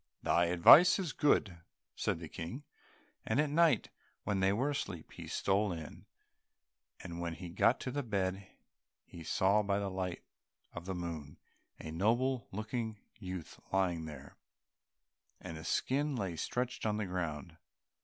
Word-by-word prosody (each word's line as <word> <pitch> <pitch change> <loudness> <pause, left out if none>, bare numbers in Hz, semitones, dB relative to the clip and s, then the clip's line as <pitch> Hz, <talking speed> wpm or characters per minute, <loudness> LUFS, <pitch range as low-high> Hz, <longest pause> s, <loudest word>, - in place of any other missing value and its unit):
"Thy 85 +1 +3
advice 90 - +8
is 180 -7 -3
good," 105 - +2 0.4
said - - -1
the 80 -1 -7
King, 85 - -6 0.6
and 110 +5 0
at 150 -1 +2
night 165 +1 +3 0.3
when 100 -2 0
they 95 0 +3
were 130 +8 +1
asleep, 95 - -5
he - - -9
stole 100 +1 +1
in, 80 -3 -8 0.9
and 85 -1 -6
when 85 -1 -3
he 90 0 -8
got 100 +8 +3
to 125 - -3
the 145 +2 -1
bed 95 -5 -2 0.6
he 85 - -11
saw 95 +6 +3
by 100 -1 0
the 100 -1 -2
light 90 -1 -3 0.5
of 85 - -7
the 95 0 -3
moon 80 -5 -6 0.4
a 80 - -7
noble 120 +9 +1
looking 110 +2 -3 0.2
youth 90 -5 -7
lying 90 -4 +1
there, 70 -3 -10 1.0
and 85 - -7
the 80 - -8
skin 140 - 0
lay 95 -7 -2
stretched 125 +9 -3
on 105 -1 0
the 105 - -1
ground. 85 -3 -4
95 Hz, 155 wpm, -33 LUFS, 85-115 Hz, 1.0 s, advice